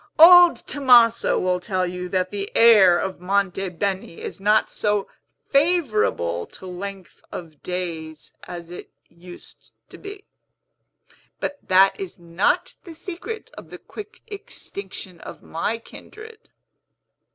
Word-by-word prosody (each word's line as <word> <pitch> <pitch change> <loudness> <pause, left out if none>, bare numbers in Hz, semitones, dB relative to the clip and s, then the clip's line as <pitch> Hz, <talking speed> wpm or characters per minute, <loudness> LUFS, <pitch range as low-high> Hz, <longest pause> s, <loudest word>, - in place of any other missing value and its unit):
Old 350 +1 +9
Tomaso 240 -5 +4
will 180 0 0
tell 185 -1 -1
you 180 0 -5
that 185 0 -1
the 200 -1 -4
air 205 -7 +7
of 190 0 -4
Monte 195 0 0
Beni 190 -1 -4
is - - -8
not 210 +2 +2
so 210 -1 -1 0.4
favorable 230 - +1
to - - -13
length 190 +1 -8
of 155 -4 -9
days 165 -4 -6
as 175 -1 -9
it 175 - -9 0.2
used 175 +1 -15 0.2
to - - -13
be. 400 0 -10 1.1
But 285 - -4
that 190 +1 +4
is 190 -2 -7
not 170 +2 0
the 335 -2 -11
secret 385 +7 -7
of - - -12
the - - -9
quick 425 +1 -12
extinction 200 - -8
of - - -11
my 170 +8 -3
kindred." 435 - -14
195 Hz, 130 wpm, -22 LUFS, 180-265 Hz, 1.1 s, Old